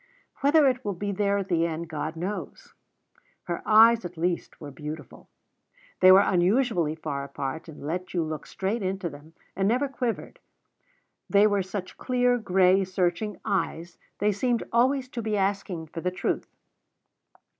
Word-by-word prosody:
Whether 290 +1 +4
it 255 0 0
will 200 -2 -2
be 200 +3 -3
there 200 +1 +1
at 195 -1 -3
the 170 -2 +2
end, 165 +1 -4
God 155 0 -4
knows. 180 -1 -6 0.7
Her 170 - -4
eyes, 225 +1 +7
at 175 -1 -8
least, 175 +1 -2
were 145 -2 -8
beautiful. 150 +3 -9 0.7
They 185 - +8
were 190 +1 +8
unusually 180 - +2
far 145 -3 -4
apart, 140 +3 -5
and 145 -2 -10
let 180 +4 -3
you 175 -2 0
look 155 -1 -5
straight 200 +4 -2
into 190 -2 -2
them, 145 +3 -14 0.2
and 195 +1 +1
never 250 +6 +2
quivered; 250 -4 -4 0.9
they 205 +1 +5
were 205 -2 +2
such 185 0 -6
clear, 250 -1 +2
gray, 190 -2 +3
searching 185 +2 -1
eyes, 170 -3 -2 0.2
they 210 +1 +2
seemed 235 +4 0
always 255 +2 +2
to 240 - -5
be 215 -1 -1
asking 195 -4 -1
for 160 +1 -7
the 180 - 0
truth. 180 - -2
190 Hz, 160 wpm, -26 LUFS, 170-215 Hz, 0.9 s, They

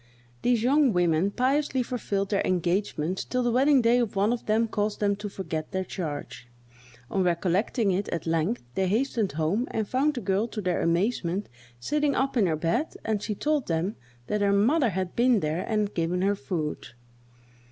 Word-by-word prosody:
These 240 -2 +2
young 275 -1 +4
women 175 +1 +2
piously 265 +3 +1
fulfilled 200 -5 -2
their 200 - +2
engagement 180 -1 -1
till 250 0 0
the 240 - +1
wedding 265 +1 +4
day 235 +2 +4
of 230 -4 -1
one 205 +4 +2
of 245 - -6
them 220 +2 +2
caused 210 -1 -2
them 200 -1 +2
to 205 0 -5
forget 160 -5 -5
their 190 0 0
charge. 150 -8 -6 0.6
On 195 - +1
recollecting 185 +5 +1
it, 190 +3 -1
at 165 - -3
length, 165 +7 0
they 190 +6 0
hastened 220 - 0
home, 165 - 0
and 220 -2 -2
found 285 +6 +1
the 245 - -3
girl, 195 +3 0
to 225 - -6
their 180 -3 0
amazement, 180 +2 0 0.3
sitting 295 - 0
up 270 +1 0
in 215 -6 +3
her 160 - +1
bed, 175 - -1
and 215 -2 0
she 210 - -3
told 300 +3 0
them 170 +5 -1 0.3
that 210 +7 -1
her 200 -1 +3
mother 240 +7 +3
had 185 -2 -3
been 240 -1 +4
there 155 +1 -1
and 210 -2 0
given 175 +2 0
her 200 +1 +2
food. 155 -2 -4
205 Hz, 185 wpm, -27 LUFS, 180-240 Hz, 0.6 s, young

